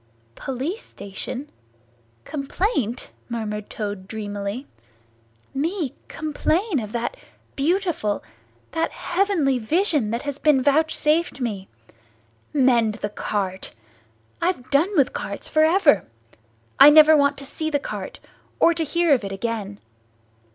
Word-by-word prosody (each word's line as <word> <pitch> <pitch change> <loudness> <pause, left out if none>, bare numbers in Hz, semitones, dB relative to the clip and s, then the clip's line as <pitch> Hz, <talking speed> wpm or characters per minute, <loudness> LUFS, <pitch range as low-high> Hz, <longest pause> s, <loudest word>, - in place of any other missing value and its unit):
"Police 270 - -4
station! 245 +8 -7 0.7
Complaint!" 275 - -2 0.2
murmured 210 -3 -4
Toad 205 -3 -5
dreamily. 205 +3 -5 0.9
"Me 315 0 -1
complain 315 - 0
of 210 -2 -6
that 240 - -2 0.4
beautiful, 325 - 0 0.5
that 325 +3 0
heavenly 350 -8 0
vision 300 - +1
that 235 +2 -2
has 285 -1 -4
been 290 -4 +3
vouchsafed 310 +2 +2
me! 205 -6 -3 0.8
Mend 240 -6 +3
the 205 -2 -4
cart! 195 -2 -3 0.7
I've 335 -8 -1
done 295 +7 +4
with 275 -3 +3
carts - - -5
for 310 - +3
ever. 320 -2 +4 0.7
I - - +11
never 310 +1 +8
want 285 -1 +3
to 275 - -7
see 315 +3 -3
the 295 - +1
cart, 280 - -6 0.4
or 340 - +5
to 330 0 -1
hear 340 0 +2
of 250 - +2
it, 195 - -4
again. 205 -1 -4
275 Hz, 120 wpm, -23 LUFS, 220-315 Hz, 0.9 s, I